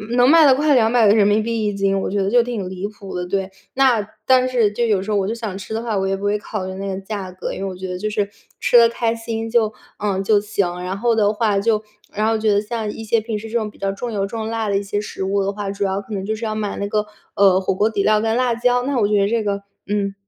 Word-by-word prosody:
能 245 +1 +5
卖 325 0 +7
到 265 -2 +6
快 295 +1 +3
200 225 -2 +4
个 - - +6
人 210 -2 +4
民 210 +1 +3
币 230 -1 -1
1 205 - 0
斤， 195 0 +1
我 - - -2
觉 200 0 0
得 195 - 0
就 245 - +6
挺 230 -6 -4
离 190 +2 -4
谱 205 -2 -10
的， 180 - -2
对。 195 0 -2 0.2
那 250 -6 +3 0.2
但 255 0 +4
是 235 -5 +2
就 235 +3 0
有 210 -4 +2
时 215 - -4
候 205 - +2
我 195 0 0
就 225 - -2
想 220 -5 -5
吃 195 +2 -7
的 225 +1 -2
话， 220 -3 -1
我 190 0 0
也 195 - 0
不 195 - -8
会 205 +1 +1
考 205 -2 -5
虑 185 - -5
那 195 +1 -5
个 190 0 -4
价 195 -2 -6
格， 185 - -5
因 - - -6
为 195 - -3
我 185 - -7
觉 185 0 -6
得 180 - -3
就 215 +1 -2
是 210 -2 -1 0.3
吃 240 - +5
得 230 0 +8
开 230 0 -1
心 225 0 -4
就 220 -2 +2 0.3
呃， 195 -2 -1
就 205 +1 +3
行。 195 -4 -2
然 185 +2 -3
后 235 +3 +2
的 210 -1 +3
话 210 -2 +1
就 215 0 +1 0.3
然 215 +1 0
后 225 0 +2
觉 215 -1 +2
得 205 - +2
像 215 0 -4
一 225 - -8
些 225 +1 +2
平 220 -1 -3
时 225 +1 -8
这 235 - 0
种 215 -2 -2
比 - - -21
较 195 0 -1
重 235 +4 -5
油 200 -2 0
重 220 +1 -4
辣 225 -1 -2
的 200 - +2
一 - - -1
些 205 +1 -2
食 210 - -6
物 195 +1 0
的 195 - 0
话， 205 -1 -5
主 200 0 -3
要 195 0 0
可 205 +2 -9
能 195 -2 -3
就 220 +2 -1
是 225 +1 -5
要 215 - -2
买 210 -2 -3
那 200 - -2
个， 210 0 0 0.3
呃， 190 -2 +5
火 190 - 0
锅 210 +3 +2
底 205 -2 -1
料 215 +1 +3
跟 225 0 0
辣 250 -2 +2
椒， 245 +1 +2
那 275 0 -1
我 205 - +3
觉 205 0 +2
得 200 - +3
这 225 0 0
个 200 -1 -2 0.2
嗯， 200 -1 -1
210 Hz, 325 characters per minute, -20 LUFS, 195-225 Hz, 0.3 s, 得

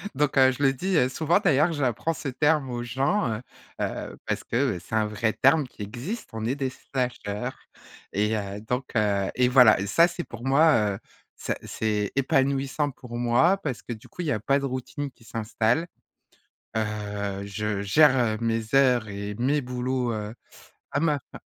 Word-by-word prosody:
Donc 145 0 +1
heu, 130 -1 +7
je 130 +2 -4
le 135 -1 +4
dis, 185 +7 0
heu, 125 -4 +3
souvent 160 +7 +2
d'ailleurs, 160 -3 +3
j'apprends 145 +2 0
ce 155 - -6
terme 150 +1 +1
aux 120 - -3
gens, 135 - 0
heu 105 - -6 0.4
heu, - - -4
parce - - -2
que, - - -5 0.2
heu, - - -8
c'est 90 +5 -6
un 110 -1 +3
vrai 105 +1 -1
terme 140 +1 +3
qui 105 - -9
existe. 125 - -6
On 110 -1 -4
est 125 +4 0
des 135 -2 -2
slashers 125 -3 -3 0.6
et, 105 +3 +1
heu, 100 -1 -4
donc 125 +4 -2
heu 100 -3 +2
et 125 0 +3
voilà! 125 -5 +7
Et 100 - -2
ça 165 - +5
c'est 175 0 -5
pour 120 -5 -10
moi, 135 -7 +4
heu, - - -9 0.4
ça - - -3
c'est 105 -2 -1
épanouissant 135 +2 +1
pour 125 -2 -9
moi 120 +11 +3
parce 140 -10 -5
que 120 - -5
du 110 - -13
coup - - -8
il - - -3
y - - +1
a 110 - 0
pas 140 +6 +2
de 140 - -3
routine 135 +2 -4
qui 125 - -23
s'installe. 115 +6 0 0.9
Heu, 105 -2 -3
je 105 0 -2
gère, 135 +6 +5
heu, 115 -3 +1
mes 115 0 -1
heures 125 -4 +4
et 100 +1 -5
mes 135 +6 +1
boulots, 125 0 -2
heu, 105 0 -4 0.6
à 140 - 0
ma 150 -2 +1
fa - - -10
125 Hz, 195 wpm, -26 LUFS, 110-140 Hz, 0.9 s, heu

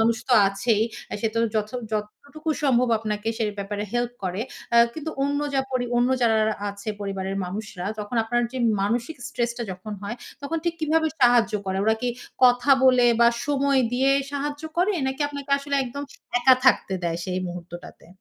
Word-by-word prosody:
মানুষ 225 0 +3
তো - - +3 0.2
আছেই। 210 +2 +1 0.4
সে 225 - +1
তো - - 0 0.2
যথ 215 0 0 0.2
যতটুকু 285 +9 -5
সম্ভব 250 -3 +3
আপনাকে 215 0 -3
সে 225 - +1
ব্যাপারে 205 +1 -3
হেল্প 240 0 0
করে। 185 +3 -2 0.3
অ্যা 235 - +7
কিন্তু 315 0 -5
অন্য 285 +1 0 0.2
যা 270 - +3
পরি 255 -1 0
অন্য 245 +1 +3
যারা 220 -2 +3 0.2
আছে 200 +2 -9
পরিবারের 195 -1 -3
মানুষরা। 190 0 -5
তখন 210 +3 -5
আপনার 240 +2 +1
যে 260 - -4 0.2
মানসিক 235 +9 -1
stress 240 -3 -1
টা 235 - -2
যখন 185 +4 -8
হয়, 220 +4 -4 0.3
তখন 325 +4 -2
ঠিক 340 -1 0
কীভাবে 320 +1 +2
সাহায্য 240 -2 +5
করে? 190 0 -1
ওরা 220 - +4
কি 250 - +1 0.4
কথা 245 +2 +4
বলে 255 -2 +6
বা 235 - +7 0.2
সময় 280 -1 +2
দিয়ে 265 +2 +3 0.2
সাহায্য 290 +1 -3
করে? 375 +4 +3
নাকি 265 +2 -3
আপনাকে 285 -1 -8
আসলে 280 0 -4
একদম 280 +4 -6 0.4
একা 255 +1 +6
থাকতে 245 -6 +4
দেয় 170 0 -1
সেই 185 0 -2
মুহূর্তটাতে? 175 -1 -9
240 Hz, 180 wpm, -24 LUFS, 210-275 Hz, 0.4 s, অ্যা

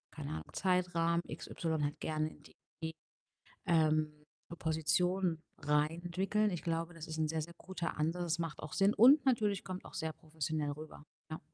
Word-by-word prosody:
keine 70 - -5
Ahnung, 80 -1 -4
Zeitrahmen, 175 -2 +2
x - - -7
y 160 -3 -1
halt 145 0 -2
gerne 155 0 -1
in 145 - -17 0.4
die, 160 0 -2 0.7
ähm, 155 -3 +3 0.5
Position 165 +2 +1 0.2
rein 150 +3 +1
entwickeln.“ 195 +4 +1
Ich 175 -4 -3
glaube, 165 +1 -1
das 165 -1 -7
ist 160 0 -4
'n 155 - +2
sehr, 160 0 -1
sehr 170 - -7
guter 175 -4 -4
Ansatz, 165 +4 0
das 170 0 0
macht 165 -2 -3
auch 155 - -7
Sinn 195 +1 +4
und 270 +7 +8
natürlich 210 -6 +2
kommt 185 0 -5
auch - - -12
sehr 160 0 -2
professionell 155 -1 -2
rüber, 155 +1 -9 0.3
ja. 155 - -4
165 Hz, 175 wpm, -35 LUFS, 155-180 Hz, 0.7 s, und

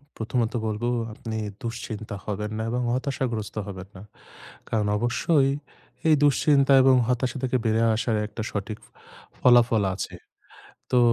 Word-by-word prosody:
প্রথমত 115 +1 -1
বলবো 110 +3 -1 0.2
আপনি 110 0 -6 0.2
দুশ্চিন্তা 110 -3 -5
হবেন 105 +1 -3
না 110 - -2
এবং 125 +1 -1
হতাশাগ্রস্ত 125 -5 -2
হবেন 95 -1 -7
না। 95 - -10 0.7
কারণ 105 -2 0
অবশ্যই 135 +5 +2 0.6
এই 155 - +7
দুশ্চিন্তা 140 -1 +4
এবং 130 -1 +6
হতাশা 125 +2 0
থেকে 130 0 +1
বের 110 - +2
হয়ে 115 -1 +3
আসার 115 -1 0
একটা 110 - -7
সঠিক 105 +1 -4 0.6
ফলাফল 120 -3 +5
আছে। 100 - -5 0.8
তো 125 - +5
115 Hz, 135 wpm, -25 LUFS, 110-130 Hz, 0.8 s, এই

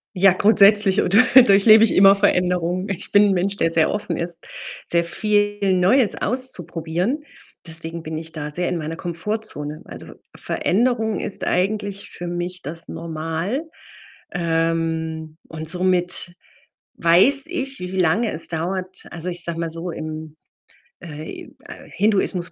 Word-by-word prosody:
Ja, 190 0 +5
grundsätzlich 205 0 +4
oder 200 +4 +3 0.3
durchlebe 215 +2 +6
ich 225 - +3
immer 195 +1 +7
Veränderungen. 180 -1 0
Ich 195 - -4
bin 205 0 +6
'n - - +2
Mensch, 195 +2 -1
der 165 - +1
sehr 160 -1 +2
offen 210 - -3
ist, 170 0 -5 0.5
sehr 170 0 +1
viel 205 +1 0
Neues 215 +6 +3
auszuprobieren. 195 - -2 0.4
Deswegen 165 0 -8
bin 155 0 -5
ich 160 0 -8
da 150 -2 -6
sehr 175 +3 -2
in 175 - -2
meiner 160 +1 -5
Komfortzone. 170 -3 -5
Also, - - -11
Ve - - -14 0.2
Veränderung 220 0 0
ist 200 - -3
eigentlich 200 +1 -2
für 175 - -8
mich 175 +1 -4
das 165 +4 -8
Normal. 165 - -4 0.7
Ähm, 165 -2 -2
und 160 -1 -7
somit 180 0 -1 0.6
weiß 190 +12 +5
ich, 275 -7 -4
wie 180 0 -6
lange 185 +7 +2
es 160 - -1
dauert. 185 +3 -4
Also, 175 +1 -5
ich 175 -1 -6
sage 170 -1 -4
mal 165 - -2
so, 165 +2 -6
im 155 -1 -7 0.6
äh, 155 -1 -8
im, - - -17
äh, - - -12
Hinduismus, 195 -3 0
180 Hz, 145 wpm, -21 LUFS, 165-205 Hz, 0.7 s, immer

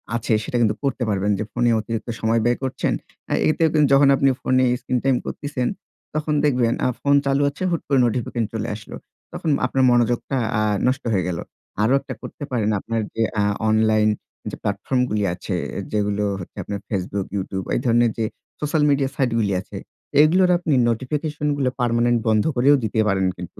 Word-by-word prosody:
আছে 115 0 0
সেটা 120 - -2
কিন্তু 105 -2 +2
করতে 135 -2 -1
পারবেন। 100 0 0
যে - - 0
ফোনে 120 - +1
অতিরিক্ত 115 +2 -4
সময় 115 +1 +2
ব্যয় 120 0 +2
করছেন। 130 - -1 0.6
এতে 155 - +1
কিন্তু 150 -2 +4
যখন 140 +1 +6
আপনি 135 0 +3
ফোনে 130 0 +2 0.2
স্ক্রিন 125 -1 -1
টাইম 135 -2 +3
করছেন 145 -4 -3 0.5
তখন 155 0 -1
দেখবেন 125 -5 +2 0.3
ফোন 140 0 +3
চালু 140 +1 +2
আছে 140 +6 -7
হুট 170 - 0
করে 140 -2 +3
নোটিফিকেশন 120 0 -1
চলে 110 +1 -2
আসলো। 105 0 -10 0.4
তখন 160 - -3 0.2
আপনার 130 +1 +1
মনোযোগটা 120 +2 +1 0.2
আ - - +1 0.3
নষ্ট 130 +1 0
হয়ে 95 -3 +1
গেলো। 85 -2 -3 0.4
আরো 115 +5 +3
একটা 135 -1 -7
করতে - - -8
পারেন 110 -4 0
আপনার 115 +3 -2
যে 115 - -1 0.2
আ - - +2 0.3
অনলাইন 110 0 +3 0.4
যে - - -5
প্ল্যাটফর্ম 130 - -1
গুলো 105 -1 0
আছে 90 - -4 0.4
যেগুলো 105 -1 0 0.2
হচ্ছে 90 - -10
আপনার 100 -1 -5
ফেসবুক, 95 0 -2
ইউটিউব 95 -1 -3
এই - - +1
ধরনের 120 -1 +3
যে 115 - 0 0.3
সোশ্যাল 150 0 0
মিডিয়া 140 -1 +2
সাইট 130 -4 +1
গুলো 100 -3 +1
আছে - - -10 0.4
এগুলোর 180 +4 +4
আপনি 165 -4 -1 0.2
নোটিফিকেশন 150 +5 -2
গুলো 135 -2 +1
পার্মানেন্ট 120 0 +2
বন্ধ 110 -1 +3
করেও 135 +4 +5
দিতে 110 0 -1
পারেন 95 -2 +1
কিন্তু। 90 -1 -9
120 Hz, 180 wpm, -22 LUFS, 110-135 Hz, 0.6 s, যখন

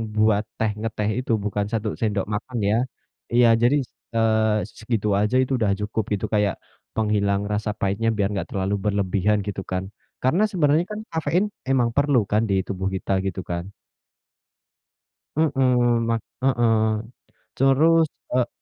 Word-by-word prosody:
buat 105 -1 +3 0.2
teh 110 -1 +1
ngeteh 105 -1 -2
itu, 125 - -3
bukan 105 0 -1
1 115 -2 -1
sendok 105 -3 0
makan 120 +4 -4
ya. 105 - +3 0.6
Iya. 120 0 +6
Jadi, 120 +4 +4 0.4
eee, 110 -1 +3 0.2
segitu 110 -1 -1
aja 105 +4 +1
itu 130 - -2
udah 105 -3 +2
cukup 105 +2 -1
gitu. 105 +1 -1
Kayak, 105 -2 +2 0.4
penghilang 100 -2 +1
rasa 105 +1 -1
pahitnya 100 +3 0
biar 100 -1 +2
nggak 95 - -3
terlalu 95 0 -1
berlebihan 100 0 +1
gitu 100 -1 -3
kan. 95 0 -1 0.4
Karena 160 +11 +3
sebenarnya 160 -2 +2
kan 210 - -4
kafein 160 +4 +1 0.2
emang 125 -3 +3
perlu 140 -2 +3
kan 105 +1 +3
di 100 - +2
tubuh 95 -1 -2
kita, 95 - -4
gitu 95 -1 -3
kan. 85 0 -3 1.7
Mhm, 125 -6 +2
ma 115 - +2 0.3
heeh. 115 -4 +2 0.5
Terus, 155 +5 +4 0.3
eee 125 -1 +2
110 Hz, 145 wpm, -23 LUFS, 105-125 Hz, 1.7 s, Iya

